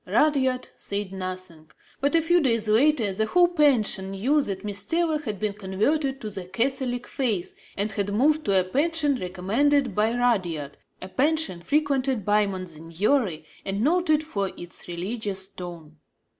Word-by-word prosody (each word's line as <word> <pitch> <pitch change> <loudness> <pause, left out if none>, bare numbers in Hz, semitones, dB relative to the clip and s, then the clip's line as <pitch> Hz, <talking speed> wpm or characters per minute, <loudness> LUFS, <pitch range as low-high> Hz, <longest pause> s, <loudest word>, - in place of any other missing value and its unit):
Rudyard 260 +3 +2
said 200 -1 -3
nothing; 185 -4 -7 0.3
but, 285 +4 +1
a 330 - +4
few 345 +2 +4
days 230 -6 +1
later, 225 -1 +3
the 220 +3 0
whole 355 +7 +5
pension 260 - +3
knew 245 +11 +1
that 195 -7 -4
Miss 200 -1 -2
Taylor 325 +5 +1
had 215 -9 -4
been 210 +1 -1
converted 265 +9 -1
to 215 - -5
the 190 -2 -6
Catholic 245 +4 -1
faith 230 - -2 0.2
and 205 +2 -1
had 200 0 -2
moved 300 +9 +2
to 195 -2 +4
a - - +2
pension 290 - +1
recommended 230 +8 +1
by 220 +4 +1
Rudyard, 175 - 0 0.2
a - - -6
pension 285 - 0
frequented 270 - 0
by 210 0 +3
monsignori 180 - -1 0.2
and 200 +2 -2
noted 310 0 +3
for 200 -11 -2
its 175 0 -6
religious 190 +2 -2
tone. 170 -5 -9
215 Hz, 155 wpm, -25 LUFS, 190-285 Hz, 0.3 s, whole